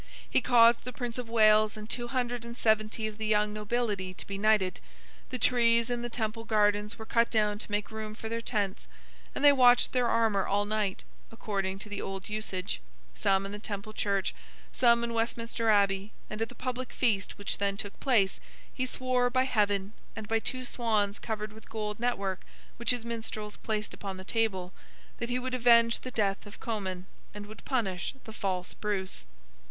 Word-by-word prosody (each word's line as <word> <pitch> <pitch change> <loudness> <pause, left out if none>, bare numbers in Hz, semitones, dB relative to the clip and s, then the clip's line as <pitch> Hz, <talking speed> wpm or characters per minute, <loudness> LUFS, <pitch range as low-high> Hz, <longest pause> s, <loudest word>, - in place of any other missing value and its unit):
He - - +2
caused 235 -1 +6
the 250 - -4
Prince 245 0 -4
of 240 -2 -5
Wales 215 -1 +5
and 215 0 -7
two 240 +1 -2
hundred 245 -2 -2
and 235 0 -8
seventy 220 -1 +1
of 215 0 -5
the 220 - -2
young 210 0 +2
nobility 210 -3 -2
to - - -8
be 195 0 -5
knighted—the 65 - -1
trees 235 -1 +4
in 240 -1 -1
the 240 - -3
Temple 225 -1 -3
Gardens 210 -1 +2
were 220 - -8
cut 230 +1 +2
down 210 -2 +1
to - - -8
make 205 +1 -1
room 215 -1 -5
for 220 - -6
their 230 +1 -2
tents, 205 -5 -2 0.5
and 290 - +1
they 290 - +10
watched 250 -2 +6
their 250 -2 +2
armour 225 -4 +2
all 205 +1 +2
night, 210 -2 -1 0.3
according 195 -4 -2
to 210 - -8
the 205 -1 -4
old 195 0 -5
usage: 190 - -3 0.3
some 195 - +2
in 195 - -5
the 205 - -6
Temple 205 0 -6
Church: 200 -3 0 0.4
some 235 -1 +4
in 235 0 -2
Westminster 230 0 -1
Abbey—and 200 +1 +1
at 225 - 0
the 245 - -11
public 255 0 -4
Feast 210 -6 +1
which 200 - -2
then 200 -1 0
took 200 0 -6
place, 225 -8 +2 0.3
he 255 0 -1
swore, 255 -1 +1
by 255 +1 +2
Heaven, 205 -5 +1 0.2
and 220 -1 -6
by 225 +1 +2
two 255 +3 -3
swans 215 -5 0
covered 215 -1 -4
with 220 - -15
gold 210 -1 -4
network 200 -6 -1 0.4
which 235 - -3
his 245 -2 +1
minstrels 220 -2 -4
placed 215 -1 -3
upon 195 -2 -6
the 185 - -8
table, 190 -4 -1 0.5
that 235 - -3
he 245 - +1
would 255 0 -3
avenge 235 -1 +5
the 255 - -6
death 205 -4 -1
of 205 - -12
Comyn, 190 -5 -3 0.3
and 205 0 -6
would 210 0 -12
punish 200 -6 -1
the 220 - -10
false 185 -4 -2
Bruce. 190 - -3
215 Hz, 190 wpm, -30 LUFS, 200-235 Hz, 0.5 s, they